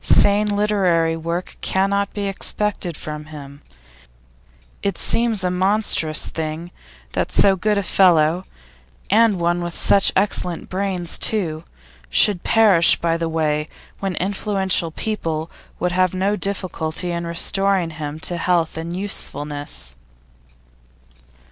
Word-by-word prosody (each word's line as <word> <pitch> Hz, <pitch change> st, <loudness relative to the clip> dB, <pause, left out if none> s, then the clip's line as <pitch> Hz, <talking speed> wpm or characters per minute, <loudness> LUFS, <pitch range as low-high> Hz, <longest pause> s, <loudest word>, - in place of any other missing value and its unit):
Sane 205 Hz, +1 st, +5 dB
literary 195 Hz, -6 st, +1 dB
work 170 Hz, +2 st, -5 dB
cannot 200 Hz, +1 st, 0 dB
be 205 Hz, -1 st, -4 dB
expected 195 Hz, -3 st, -2 dB
from 150 Hz, 0 st, -7 dB
him. 145 Hz, -2 st, -11 dB, 1.2 s
It 200 Hz, -3 st, -2 dB
seems 225 Hz, -3 st, +1 dB
a 180 Hz, -, 0 dB
monstrous 185 Hz, -4 st, +2 dB
thing 160 Hz, +2 st, -5 dB, 0.4 s
that -, -, -2 dB
so 195 Hz, -1 st, +4 dB
good 210 Hz, +3 st, 0 dB
a 200 Hz, -, 0 dB
fellow, 175 Hz, -2 st, +3 dB, 0.7 s
and 215 Hz, -2 st, +3 dB
one 175 Hz, +1 st, 0 dB
with 175 Hz, -1 st, -5 dB
such 200 Hz, -, +5 dB
excellent 185 Hz, -3 st, -1 dB
brains 185 Hz, -3 st, -1 dB
too, 170 Hz, -7 st, -1 dB, 0.4 s
should 175 Hz, -, +3 dB
perish 205 Hz, -7 st, +5 dB
by 165 Hz, -1 st, 0 dB
the 165 Hz, 0 st, -2 dB
way 150 Hz, -1 st, -1 dB, 0.3 s
when 195 Hz, -2 st, -3 dB
influential 190 Hz, -2 st, +1 dB
people 165 Hz, -4 st, -4 dB, 0.3 s
would 180 Hz, -, -1 dB
have 185 Hz, 0 st, +1 dB
no 195 Hz, +3 st, 0 dB
difficulty 180 Hz, -4 st, -2 dB
in 170 Hz, 0 st, -4 dB
restoring 185 Hz, +1 st, +1 dB
him 155 Hz, -1 st, -6 dB
to 175 Hz, -, 0 dB
health 170 Hz, -2 st, 0 dB
and 170 Hz, +2 st, -5 dB
usefulness. 145 Hz, -, -2 dB
180 Hz, 125 wpm, -20 LUFS, 165-200 Hz, 1.2 s, Sane